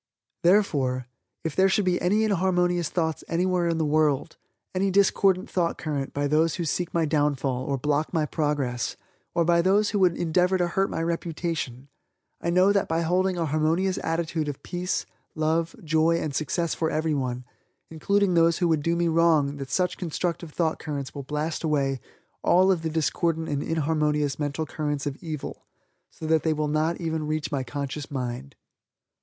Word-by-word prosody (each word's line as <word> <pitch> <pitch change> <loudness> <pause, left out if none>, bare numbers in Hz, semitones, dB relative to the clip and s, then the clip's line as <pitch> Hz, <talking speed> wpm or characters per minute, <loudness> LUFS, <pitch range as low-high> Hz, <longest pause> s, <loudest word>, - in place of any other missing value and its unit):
Therefore, 145 -10 +2 0.4
if 160 -3 -3
there 190 +1 +4
should 195 +1 +2
be 180 -1 +1
any 205 +5 +2
inharmonious 180 -4 +1
thoughts 160 -3 -1
anywhere 180 0 +1
in 165 -1 0
the 160 - +1
world 150 0 +1 0.4
any 190 +1 +1
discordant 195 -1 +3
thought 170 -2 0
current 145 -3 -3
by 145 0 -1
those 155 +2 +2
who 170 - -3
seek 175 +3 -1
my 165 -1 +1
downfall, 145 -4 0
or 140 - -1
block 150 +3 0
my 160 -3 +1
progress, 145 -6 -1 0.4
or 170 - +3
by 170 0 +4
those 200 +4 +3
who 205 - 0
would 180 -3 +3
endeavor 180 +3 +2
to 175 -1 0
hurt 195 +3 +1
my 165 - -2
reputation 165 -6 -3 0.5
I 170 - -1
know 185 +3 +4
that 200 - +1
by 165 +1 0
holding 180 +2 +1
a 170 - 0
harmonious 160 +5 +1
attitude 165 -1 -1
of 140 - -7
peace, 180 +1 -2 0.3
love, 160 +1 0
joy 160 +1 +2
and 155 -3 -3
success 165 +3 -1
for 160 - -1
everyone, 140 -6 -1 0.5
including 200 +4 +1
those 165 0 +4
who 175 - +1
would 160 -2 +2
do 165 +3 +1
me 170 0 +1
wrong 160 -4 +3
that 135 -1 -6
such 180 +5 0
constructive 170 -1 -3
thought 160 0 0
currents 140 -3 -5
will 140 - -5
blast 150 +4 -3
away 140 -4 +1 0.4
all 185 +2 +4
of 180 -4 +1
the 160 - -2
discordant 160 +1 0
and 145 -1 -1
inharmonious 150 -3 0
mental 145 +1 -2
currents 145 -1 -3
of 145 -1 -4
evil 155 -4 -6 0.4
so - - -9
that 160 0 +3
they 160 - +1
will 150 0 -1
not 155 +3 0
even 160 -3 -2
reach 155 0 -2
my 140 -2 0
conscious 140 +1 -5
mind. 130 0 -5
160 Hz, 180 wpm, -26 LUFS, 150-175 Hz, 0.5 s, there